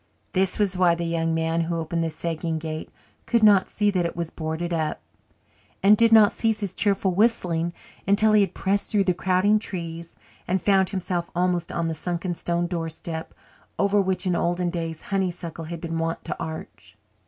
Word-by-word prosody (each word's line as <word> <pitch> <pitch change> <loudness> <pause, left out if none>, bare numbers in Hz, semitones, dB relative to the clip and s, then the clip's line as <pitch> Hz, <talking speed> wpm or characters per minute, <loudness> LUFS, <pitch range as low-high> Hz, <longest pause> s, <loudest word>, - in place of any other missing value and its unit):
This 190 0 +3
was 200 -3 +2
why 180 -2 +4
the 170 - -4
young 165 -1 0
man 165 +1 0
who 165 +1 -2
opened 165 +1 -2
the 165 - -1
sagging 165 0 -3
gate 155 0 -5 0.4
could 235 -2 +2
not 200 -3 +6
see 210 -1 +1
that 185 -3 +1
it 170 - -3
was 170 -1 -3
boarded 160 +2 -3
up, 155 -2 -1 0.8
and 205 +2 +7
did 230 +1 +4
not 215 -2 +7
cease 225 -2 0
his 195 -3 -3
cheerful 195 -2 +1
whistling 175 -5 +1 0.4
until 215 +2 +5
he 210 - +6
had 190 -2 -1
pressed 200 +1 0
through 205 -2 +2
the 185 -2 +2
crowding 185 +4 +2
trees 170 -4 -6 0.3
and 185 +2 +1
found 190 0 +3
himself 180 -3 -2
almost 175 -1 0
on 170 -1 -1
the 165 - -1
sunken 175 +2 -3
stone 170 0 -1
doorstep 165 -1 -5 0.4
over 200 +1 +3
which 190 -1 -1
in 180 -2 +1
olden 175 +1 0
days 165 -2 -4
honeysuckle 175 -4 -3
had 170 +1 -6
been 165 -1 -3
wont 165 +1 -3
to - - -3
arch. 160 0 -8
175 Hz, 190 wpm, -24 LUFS, 165-195 Hz, 0.8 s, and